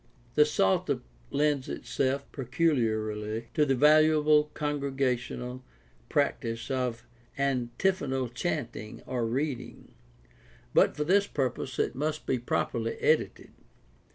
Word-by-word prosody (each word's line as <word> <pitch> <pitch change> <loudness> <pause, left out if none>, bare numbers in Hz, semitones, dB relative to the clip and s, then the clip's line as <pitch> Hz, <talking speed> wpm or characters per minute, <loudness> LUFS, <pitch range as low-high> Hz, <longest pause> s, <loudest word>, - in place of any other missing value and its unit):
The 150 - +6
Psalter 95 -10 +1 0.3
lends 145 -2 +1
itself 140 +1 -1
peculiarly 115 -6 -1
to 150 -1 +3
the 135 - +3
valuable 150 +1 +5
congregational 135 -4 -2 0.5
practice 115 -5 -1
of 125 -3 -2 0.3
antiphonal 135 +1 0
chanting 120 -5 -4
or 125 -3 -1
reading; 130 +1 -4 0.8
but - - +4
for 150 - +1
this 200 +5 +3
purpose 130 -2 -2
it - - 0
must 150 +4 -2
be 130 - 0
properly 115 -1 -1
edited. - - +1
135 Hz, 100 wpm, -29 LUFS, 120-150 Hz, 0.8 s, The